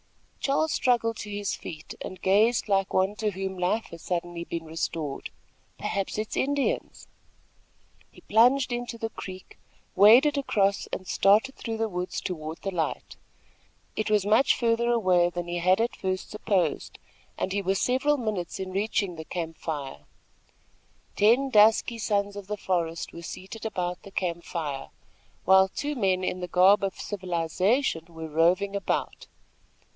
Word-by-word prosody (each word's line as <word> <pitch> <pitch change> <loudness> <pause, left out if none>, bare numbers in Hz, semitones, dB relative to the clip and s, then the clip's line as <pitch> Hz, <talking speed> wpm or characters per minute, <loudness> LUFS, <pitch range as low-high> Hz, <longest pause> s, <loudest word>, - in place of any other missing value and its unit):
Charles 290 +3 +1
struggled 230 -4 +1
to 210 - -7
his 205 -1 -2
feet 155 -1 -9
and 185 - -7
gazed 215 +6 +3
like 195 -1 +1
one 190 +2 +2
to 215 -1 0
whom 190 -1 -5
life 190 +5 0
has 170 - -10
suddenly 175 -1 -3
been 170 -1 -5
restored. 160 -2 -4 0.5
"Perhaps 195 0 -3
it 215 0 -2
is - - -5
Indians!" 280 0 -1 1.0
He - - -18
plunged 250 +5 +4
into 240 -1 -4
the 225 -1 -4
creek, 185 -1 -10 0.4
waded 250 +9 +7
across 200 -7 +1
and 185 - -6
started 215 +7 +3
through 225 -2 -5
the 225 0 0
woods 180 -2 -3
toward 160 -2 -5
the 195 - -2
light. 165 -4 -3 0.8
It 215 - -1
was 210 -2 +2
much 215 +6 +4
further 235 0 +1
away 185 -7 +3
than 175 0 -5
he 175 0 -2
had 185 +3 +3
at 235 +1 0
first 185 -1 -3
supposed, 190 -6 -1 0.4
and 190 - -2
he 200 - 0
was 195 0 0
several 265 +4 +2
minutes 215 -8 -3
in 190 -1 -4
reaching 200 -2 -1
the 160 - -7
camp 165 -2 -5
fire. 145 -4 -5 1.1
Ten 245 +6 +4
dusky 220 +2 +4
sons 205 -1 0
of 200 -2 -8
the 210 0 -3
forest 170 -4 -2
were 170 - -8
seated 195 +6 -7
about 180 -4 -3
the - - -12
camp 175 -3 -3
fire, 145 -6 -4 0.6
while 190 +1 +6
two 290 +9 -4
men 190 -6 +1
in 185 - -2
the 180 - -4
garb 185 +4 +5
of 195 - -2
civilization 185 - 0
were 160 -1 -7
roving 175 +6 +2
about. 200 - -2
195 Hz, 160 wpm, -27 LUFS, 175-220 Hz, 1.1 s, waded